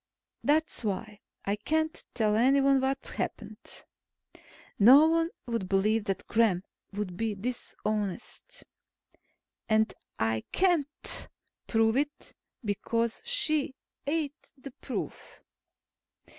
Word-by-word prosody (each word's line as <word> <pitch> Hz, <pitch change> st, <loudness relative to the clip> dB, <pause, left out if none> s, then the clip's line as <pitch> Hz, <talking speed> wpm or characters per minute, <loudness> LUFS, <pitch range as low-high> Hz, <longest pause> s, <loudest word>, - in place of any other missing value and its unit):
That's 310 Hz, -2 st, +2 dB
why 210 Hz, 0 st, -3 dB, 0.3 s
I 200 Hz, -, +1 dB
can't 315 Hz, +8 st, 0 dB
tell 215 Hz, -3 st, +2 dB
anyone 270 Hz, +3 st, +4 dB
what 265 Hz, +1 st, -1 dB
happened. -, -, -5 dB, 0.9 s
No 260 Hz, +9 st, +9 dB
one 330 Hz, 0 st, +2 dB, 0.2 s
would 230 Hz, -6 st, -2 dB
believe 210 Hz, +2 st, +2 dB
that 195 Hz, -2 st, -2 dB
Gremm 215 Hz, -6 st, +2 dB, 0.3 s
would 200 Hz, -3 st, -4 dB
be 220 Hz, +1 st, -1 dB
dishonest. 215 Hz, -, -4 dB, 1.1 s
And 220 Hz, 0 st, +3 dB, 0.2 s
I 110 Hz, 0 st, 0 dB
can't 340 Hz, -6 st, +1 dB, 0.4 s
prove 225 Hz, +1 st, +3 dB
it, 290 Hz, +1 st, -2 dB, 0.3 s
because 230 Hz, +3 st, -1 dB
she 310 Hz, -, +1 dB, 0.3 s
ate 295 Hz, -1 st, -2 dB
the 275 Hz, +1 st, -9 dB
proof. -, -, -6 dB
230 Hz, 100 wpm, -29 LUFS, 210-290 Hz, 1.1 s, No